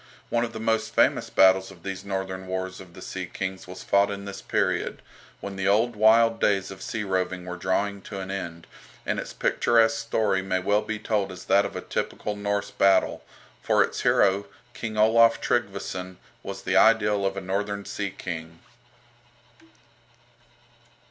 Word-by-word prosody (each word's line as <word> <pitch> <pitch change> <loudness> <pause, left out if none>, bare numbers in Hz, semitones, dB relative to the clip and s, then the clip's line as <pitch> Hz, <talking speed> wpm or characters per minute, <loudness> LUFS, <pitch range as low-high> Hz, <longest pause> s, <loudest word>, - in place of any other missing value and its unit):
One 120 0 +2
of 120 - -3
the 110 - -7
most 110 0 -1
famous - - +3
battles 95 0 +4
of 90 -4 -15
these 95 -1 -5
northern 95 -1 -4
wars 95 0 -4
of 90 -2 -14
the - - -10
sea - - -5
kings 95 -1 -5
was 90 +1 -9
fought 100 0 +3
in 100 0 -5
this 100 0 -7
period, - - -1 0.4
when 100 -1 -6
the 95 0 -1
old 110 +4 +3
wild 115 +2 +5
days 95 -2 +1
of 95 0 -10
sea 110 - -3
roving 95 -2 -2
were 90 0 -5
drawing 100 +3 -1
to 100 - -6
an 95 0 -5
end, 85 -4 -5 0.4
and - - -1
its - - -6
picturesque 115 -1 +2
story 110 -4 +1
may 95 -1 -1
well 100 +3 +2
be 110 0 -4
told 105 -2 -1
as 90 -1 -10
that 100 +1 +4
of - - -12
a - - -4
typical 105 - -3
Norse 100 0 -2
battle, 100 -1 +2 0.4
for - - +3
its - - -4
hero, 100 +1 +3 0.3
King 110 -2 -5
Olaf 115 +1 +5
Tryggveson, 95 -5 -2 0.2
was - - -7
the - - 0
ideal 105 -3 +4
of 95 0 -1
a - - -3
northern 100 +2 -3
sea 100 -1 -3
king. 85 -3 -7
100 Hz, 175 wpm, -26 LUFS, 95-105 Hz, 0.4 s, wild